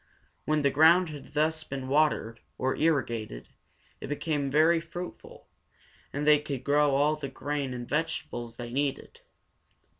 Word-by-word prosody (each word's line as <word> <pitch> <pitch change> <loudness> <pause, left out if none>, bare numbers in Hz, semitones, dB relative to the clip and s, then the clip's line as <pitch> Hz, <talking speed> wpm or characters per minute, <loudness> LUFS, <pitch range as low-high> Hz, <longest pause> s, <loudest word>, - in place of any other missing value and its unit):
When 155 -1 +1
the 140 - +3
ground 165 +5 +5
had 150 0 -10
thus 155 +1 +1
been 135 -3 -6
watered, 135 -5 +1 0.2
or 130 +1 0
irrigated, 120 - -1 0.5
it - - -7
became 145 -1 -2
very 160 +4 +4
fruitful, 175 +2 -9 0.6
and 145 +1 -3
they 150 -1 +6
could 140 -4 -5
grow 145 0 +3
all 145 +2 +3
the 145 -3 -6
grain 145 -2 -3
and 120 -1 -6
vegetables 130 -6 -3
they 120 -1 -6
needed. 140 +1 -3
145 Hz, 145 wpm, -28 LUFS, 130-155 Hz, 0.6 s, they